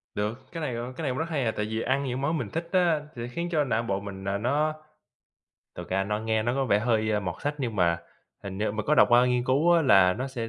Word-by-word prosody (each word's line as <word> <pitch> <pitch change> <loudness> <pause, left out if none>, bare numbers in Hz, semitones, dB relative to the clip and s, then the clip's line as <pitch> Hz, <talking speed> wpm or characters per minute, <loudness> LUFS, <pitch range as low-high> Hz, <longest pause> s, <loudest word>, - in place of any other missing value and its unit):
Được, 115 +6 -4
cái 165 - -6
này, 135 -6 -2
ờ, 120 +2 -5
cái 165 - -5
này 135 - 0
cũng 125 - -4
rất 165 +1 -2
hay 140 -6 -1
à, 110 - +1
tại 105 - -1
vì 110 +1 -3
ăn 135 +2 0
những 130 0 -3
món 155 +3 0
mình - - -4
thích 165 +1 -4
á, 175 -5 +3
thì 120 - -6
nó 120 - -4
khiến 170 +6 -3
cho 155 -3 +2
não 120 -4 0
bộ 100 -4 -1
mình 100 -1 -8
là 100 +1 -1
nó 145 +8 0 1.0
thực - - -8
ra 95 +1 +1
nó 105 +1 -1
nghe 110 0 0
nó 120 +2 0
có 135 - 0
vẻ 105 -5 +3
hơi 110 -2 +1
mọt 90 -3 -3
sách 145 +1 -1
nhưng 120 -6 -3
mà 85 -2 +2 0.4
hình 95 -1 -6
như 105 0 0
mình 110 0 -4
có 150 - +4
đọc - - +6
qua 120 +1 +6
nghiên 125 -1 +1
cứu 145 +7 +3
á 170 -1 +4
là 95 -8 +6
nó 130 +7 -4
sẽ, 120 -3 -5
120 Hz, 290 wpm, -27 LUFS, 105-145 Hz, 1.0 s, đọc